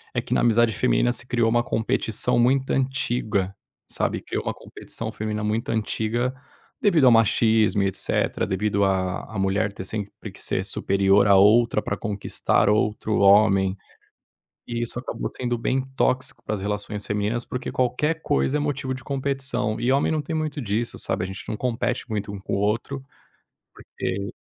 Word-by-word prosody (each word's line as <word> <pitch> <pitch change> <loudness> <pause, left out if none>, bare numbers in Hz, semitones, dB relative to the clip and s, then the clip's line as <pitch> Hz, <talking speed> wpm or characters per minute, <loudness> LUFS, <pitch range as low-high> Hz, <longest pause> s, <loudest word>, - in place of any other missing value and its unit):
é - - +1
que - - -4
na - - +2
amizade 120 -1 +3
feminina - - +2
se 125 - -1
criou 120 -2 +2
uma 120 +1 +2
competição 115 +2 +1
muito 130 +2 +2
antiga. 120 -7 0 0.3
Sabe, - - -1
criou - - -4
uma - - -1
competição - - -5
feminina 105 0 -4
muito 110 +2 -1
antiga, 115 +3 -1 0.5
devido 175 -10 +4
ao 125 - +7
machismo 110 -2 +3
e 100 - +2
etcetera, 95 - 0
devido 100 +1 0
à 95 -1 0
à - - -2
mulher 100 +1 0
ter 95 - -7
sempre 105 0 -4
que - - -10
ser 95 +1 -1
superior 100 +1 +3
a 100 - +6
outra 105 +3 +5
pra - - -3
conquistar 105 -1 0
outro 105 0 +1
homem. 100 -1 +5 0.9
E 120 0 -3
isso 120 +1 -3
acabou 125 - -4
sendo 120 -1 -2
bem 130 +3 0
tóxico 130 -1 0
para 110 - -2
as 95 - -5
relações 105 0 -3
femininas, 105 +3 -1
porque 125 0 -5
qualquer 150 +6 0
coisa 145 0 +1
é - - -1
motivo 135 -2 -2
de 130 -1 -9
competição. 135 -5 -1
E 120 +2 +2
homem 140 +1 +2
não 155 - 0
tem 160 +3 -5
muito 155 -2 -2
disso, 110 +2 -2
sabe, - - -1
a - - -3
gente 95 +1 -7
não 110 - -2
compete 125 +1 -2
muito 105 -1 -3
um 100 - -7
com - - -4
o - - 0
outro, 115 +7 -1 0.7
porque 100 +3 -5
110 Hz, 175 wpm, -24 LUFS, 100-125 Hz, 0.9 s, ao